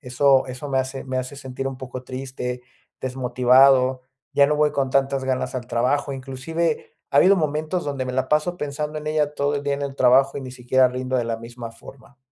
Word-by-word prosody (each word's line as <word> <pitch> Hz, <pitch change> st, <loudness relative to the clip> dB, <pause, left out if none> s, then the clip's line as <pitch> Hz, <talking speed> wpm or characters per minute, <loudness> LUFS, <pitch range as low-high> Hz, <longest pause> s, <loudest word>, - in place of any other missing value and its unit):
Eso 130 Hz, +1 st, +3 dB
eso 130 Hz, +3 st, -7 dB
me 135 Hz, -1 st, +1 dB
hace 130 Hz, +1 st, -3 dB
me 130 Hz, -1 st, -2 dB
hace 130 Hz, +2 st, -5 dB
sentir 135 Hz, -1 st, -6 dB
un 135 Hz, -, -6 dB
poco 130 Hz, -1 st, -8 dB
triste, 130 Hz, -1 st, -5 dB, 0.4 s
desmotivado. 130 Hz, 0 st, +4 dB, 0.3 s
Ya 140 Hz, 0 st, +5 dB
no 150 Hz, -, +1 dB
voy 150 Hz, 0 st, +3 dB
con 135 Hz, -1 st, 0 dB
tantas 135 Hz, 0 st, +1 dB
ganas 130 Hz, +1 st, -2 dB
al 125 Hz, -2 st, -4 dB
trabajo. 140 Hz, +5 st, 0 dB
Inclusive 135 Hz, +5 st, -3 dB, 0.2 s
ha 140 Hz, -, 0 dB
habido 195 Hz, +5 st, +6 dB
momentos 155 Hz, +2 st, -1 dB
donde 140 Hz, -2 st, -3 dB
me 125 Hz, -, -3 dB
la 130 Hz, 0 st, -1 dB
paso 155 Hz, +4 st, +1 dB
pensando 150 Hz, 0 st, -4 dB
en 150 Hz, -, -9 dB
ella 150 Hz, -1 st, 0 dB
todo 145 Hz, +1 st, 0 dB
el 140 Hz, -, -4 dB
día 140 Hz, -1 st, 0 dB
en 145 Hz, -, -5 dB
el 140 Hz, -1 st, -4 dB
trabajo 135 Hz, +2 st, +4 dB
y -, -, -6 dB
ni 130 Hz, -1 st, -7 dB
siquiera 130 Hz, +1 st, +3 dB
rindo 130 Hz, +1 st, -2 dB
de 120 Hz, -, 0 dB
la 115 Hz, -1 st, -2 dB
misma 115 Hz, 0 st, -9 dB
forma. 135 Hz, +4 st, -15 dB
135 Hz, 215 wpm, -23 LUFS, 130-145 Hz, 0.4 s, habido